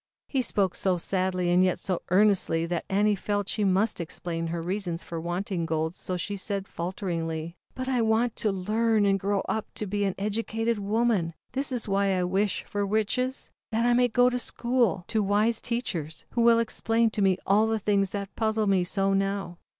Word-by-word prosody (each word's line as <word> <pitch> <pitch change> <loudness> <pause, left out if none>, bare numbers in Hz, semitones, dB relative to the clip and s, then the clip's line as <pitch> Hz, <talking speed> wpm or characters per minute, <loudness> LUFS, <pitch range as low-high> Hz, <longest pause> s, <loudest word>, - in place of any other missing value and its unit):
He 270 - 0
spoke 195 -6 +1
so 185 -2 0
sadly, 185 0 0
and 180 +1 +5
yet 185 -1 +2
so 185 -3 -2
earnestly, 185 -4 +3
that 170 0 -2
Annie 205 +2 +3
felt 205 0 -2
she 210 - -1
must 195 +1 +1
explain 165 0 -4
her 170 +1 -3
reasons 175 0 -3
for 165 -1 -5
wanting 175 0 -2
gold, 160 +1 -1
so 180 0 -4
she 200 +3 -3
said, 195 0 -3
falteringly: 170 -2 -3 0.2
"But 255 0 -4
I 255 -2 +1
want 225 +1 +2
to 215 - +1
learn 215 +3 +1
and 195 -1 +3
grow 200 +1 0
up 220 0 -3
to 215 - -3
be 205 +1 -1
an 195 - -1
educated 225 +2 -1
woman, 205 -5 +1 0.2
this 270 +2 0
is 245 -4 -2
why 195 -1 +2
I 180 - +1
wish 195 +2 0
for 205 0 -2
Riches, 220 +6 -1 0.2
that 230 +1 +1
I 240 - +4
may 245 +1 +4
go 245 +1 +4
to 250 - -1
school, 235 -7 0
to 220 - +1
wise 210 +3 +2
teachers, 180 -11 -4
who 235 - 0
will 235 0 +6
explain 230 0 +1
to 215 - -2
me 190 -2 +3
all 210 +3 +4
the 225 0 +1
things 200 -2 +1
that 200 0 -5
puzzle 220 -1 +1
me 195 -3 +3
so 195 +2 0
now." 195 -3 -1
200 Hz, 195 wpm, -27 LUFS, 180-220 Hz, 0.2 s, will